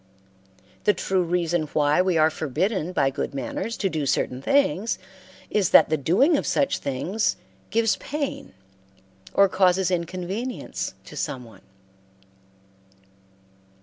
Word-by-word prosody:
The 210 - +4
true 190 +1 0
reason 175 -2 0
why 150 +2 +3
we 185 -2 +1
are 155 0 +4
forbidden 165 - -1
by 135 -6 +1
good 140 - -4
manners 140 - -4
to 195 - 0
do 155 -6 -2
certain 130 0 0
things 225 - +1 0.5
is 200 -4 +2
that - - +7
the 155 - +2
doing 195 - +3
of - - -2
such 280 - +1
things 175 +11 -1 0.3
gives 225 -1 +2
pain 290 - -4 0.8
or 200 - +6
causes 185 -1 +2
inconvenience 185 +8 -3
to - - -11
some 130 -2 -3
one. 115 - -16
180 Hz, 125 wpm, -24 LUFS, 155-210 Hz, 0.8 s, that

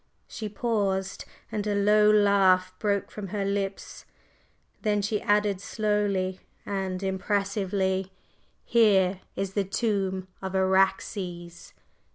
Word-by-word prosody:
…" - - -45
She 215 -2 -6
paused, 200 -4 -1 0.3
and 210 -1 -2
a 205 - 0
low 210 +1 +4
laugh 195 -3 +4
broke 200 -2 -1
from 210 -2 -6
her 200 +1 -2
lips; 200 0 -3 0.8
then 210 -1 +1
she 210 +1 -1
added 205 -2 +1
slowly 200 -3 -1 0.3
and 190 -1 -3
impressively: 195 -1 -1 0.5
"Here 195 -5 +3
is 195 -1 -3
the 200 - +1
tomb 195 -2 -1
of 190 0 -4
Araxes!" 190 -2 0
195 Hz, 115 wpm, -27 LUFS, 190-210 Hz, 0.8 s, low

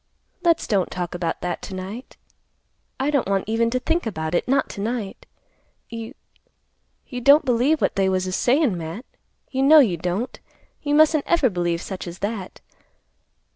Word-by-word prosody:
"Let's 335 -2 +2
don't 195 -5 +1
talk 180 -1 -4
about 175 -2 -3
that 175 -1 -3
to 190 - -7
night. 195 +7 -8 0.8
I 275 +3 0
don't 280 -8 +1
want 195 -1 +1
even 230 +1 +1
to 255 +2 -1
think 330 +2 -1
about 160 -5 -3
it, 175 - 0
not 275 +2 +2
to 200 - -6
night. 220 -2 -4 0.6
You—you 245 - -12
don't 280 +4 +6
believe 255 +5 +2
what - - +1
they 195 -1 +2
was 185 0 0
a 185 - -3
sayin', 250 - +2
Matt; 170 +8 -6 0.5
you 265 -1 -1
know 295 +4 +7
you 220 - +5
don't. 180 +9 -3 0.4
You 290 -1 0
mustn't 310 -1 +4
ever 295 -8 +3
believe 175 -2 -1
such 190 -2 -6
as 175 +1 -7
that. 200 -2 -5
225 Hz, 170 wpm, -23 LUFS, 185-275 Hz, 0.8 s, know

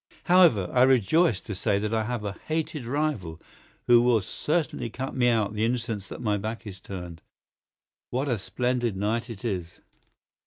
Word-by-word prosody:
However, 175 - +5
I 125 - +4
rejoice 130 - +4
to 105 - -6
say 100 +2 0
that 105 +2 -2
I 110 -1 +1
have 120 -2 -3
a 100 - -3
hated 155 -3 -2
rival 125 - -2 0.5
who 120 -1 +6
will 120 -3 +3
certainly 150 - -2
cut 130 +4 -5
me 125 -2 +3
out 110 -3 +1
the 105 0 -1
instant 115 -5 -2
that - - -8
my 105 -2 +1
back 110 +3 -5
is 95 -3 -8
turned. 90 -4 -8 0.9
What 130 +4 -1
a 120 -5 0
splendid 120 +1 -1
night 115 +5 -1
it 115 -1 -8
is!" 90 -6 -4
115 Hz, 170 wpm, -26 LUFS, 100-125 Hz, 0.9 s, who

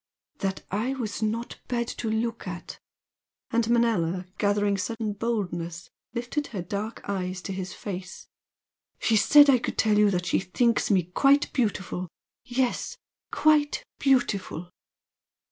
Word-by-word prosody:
"That 195 -1 -2
I 230 +7 0
was 225 -5 -4
not 225 +2 -2
bad 235 -1 -1
to 225 - -1
look 225 -1 -2
at 175 -1 -7 0.3
" - - -45
and 230 0 +1
Manella, 190 -7 +2
gathering 205 0 +2
sudden 220 +1 -2
boldness, 175 -7 -3 0.2
lifted 245 +5 -2
her 195 -6 -5
dark 205 +5 -5
eyes 185 -2 -2
to 195 - -4
his 185 0 -5
face 185 -2 -7 0.7
"She 225 - +2
said 290 +7 +7
I 265 -3 +6
could - - -4
tell 210 -1 +3
you 210 -1 +6
that 180 -2 -1
she - - +2
thinks 230 +6 +1
me 190 -4 +4
quite 275 - +3
beautiful! 195 -7 -1 0.4
Yes! 250 0 -1 0.3
quite 300 -1 +3
beautiful!" 205 - +1
215 Hz, 140 wpm, -27 LUFS, 185-235 Hz, 0.7 s, said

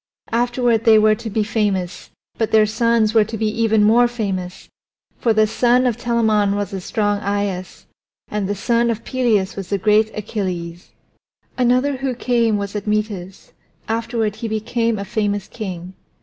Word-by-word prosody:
Afterward 240 -1 +1
they 225 -2 +6
were 215 0 +5
to 225 +1 -5
be 215 +1 0
famous, 205 -4 -2 0.3
but 225 0 -1
their 220 -1 +5
sons 225 0 +1
were 220 -2 +5
to 220 +2 -6
be 220 - -1 0.2
even 220 -1 +3
more 235 +3 +5
famous, 195 -6 -4 0.5
for 235 - +2
the 215 0 +4
son 245 +3 +2
of 245 -3 +1
Telamon 220 -4 +1
was 205 -1 -3
strong 205 -1 0
Aias, 200 -2 -3 0.4
and 205 -2 -3
the 205 - -1
son 235 +3 +1
of 230 -1 -2
Peleus 230 -7 0
was 195 -1 -7
great 215 0 +4
Achilles. 180 -5 -4 0.7
Another 255 +2 +2
who 265 -1 -2
came 235 -3 +1
was 200 0 -5
Admetus; 210 -3 -3 0.3
afterward 225 -1 -2
he 230 - -4
became 230 +1 -1
a 200 - -4
famous 205 -2 -2
king. 185 -5 -7
215 Hz, 155 wpm, -20 LUFS, 205-235 Hz, 0.7 s, they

